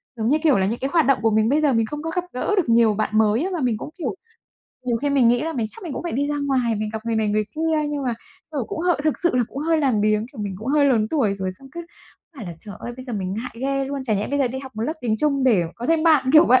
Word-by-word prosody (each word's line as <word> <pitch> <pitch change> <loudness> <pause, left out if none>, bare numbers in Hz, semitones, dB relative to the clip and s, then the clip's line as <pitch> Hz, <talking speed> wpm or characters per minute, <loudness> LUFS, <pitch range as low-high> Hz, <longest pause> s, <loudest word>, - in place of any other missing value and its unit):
giống 220 -1 -2
như 295 +4 +4
kiểu 295 -8 +4
là, 190 - +2
những 230 +3 -2
cái 270 - -2
hoạt 325 -5 +4
động 275 -1 +3
của 225 -1 +2
mình 220 +2 +2
bây 300 +3 +2
giờ 285 -4 +3
mình 225 -1 +2
không 295 +5 -6
có 325 - -3
gặp 360 - 0
gỡ 410 +11 -1
được 325 -10 +1
nhiều 230 -2 +5
bạn 215 +1 -1
mới. 220 - +2
Mà 345 - -2
mình 240 -4 +1
cũng, - - -7
kiểu, 355 - -3 0.7
nhiều 235 -2 +1
khi 285 +4 -1
mình 260 -4 +4
nghĩ 240 +1 +3
là 325 +1 -2
mình 230 -6 -1
chắc - - -8
mình 330 -6 -5
cũng - - -5
phải 345 - -4
đi 280 +4 0
ra 295 - -1
ngoài, 250 -4 +1
mình 215 0 -2
gặp 220 +1 -5
người 225 -1 0
này 215 -1 +1
người 210 +1 +1
kia, 315 -2 0
nhưng 290 -1 -3
mà, 240 -2 0 0.4
kiểu, 275 -6 -2
cũng 320 - -4
h 355 +1 +1
thực 310 - +1
sự 345 -7 +2
là 245 - +3
cũng 275 - -8
hơi 320 +1 +1
làm 255 -7 +2
biếng. 215 +1 +1
Kiểu, 220 - -8
mình 200 -2 -4
cũng 225 +4 -6
hơi 290 0 +3
lớn 230 -6 +3
tuổi 225 -11 +1
rồi, 190 -1 -3
xong 270 +8 -15
cứ 340 0 -7 0.5
phải 220 -7 -7
là, 170 - -5
trời 205 +2 -10
ơi, 240 - -6
bây 255 - -9
giờ 245 - -7
mình 190 -2 -3
ngại 240 +3 -5
ghê 275 0 0
luôn, 275 0 -4
chẳng 215 -6 0
lẽ 205 - -2
bây 285 +1 -1
giờ 265 -3 +2
đi 260 +2 -5
học 265 -1 -9
một 220 - -2
lớp 305 - -1
tiếng 220 -3 0
Trung 280 0 +1
để 215 -9 +4
có 240 +2 -6
thêm 325 -1 +2
bạn, 295 -6 +4
kiểu 315 +2 +8
vậy. 255 +1 +6
255 Hz, 330 wpm, -22 LUFS, 220-295 Hz, 0.7 s, kiểu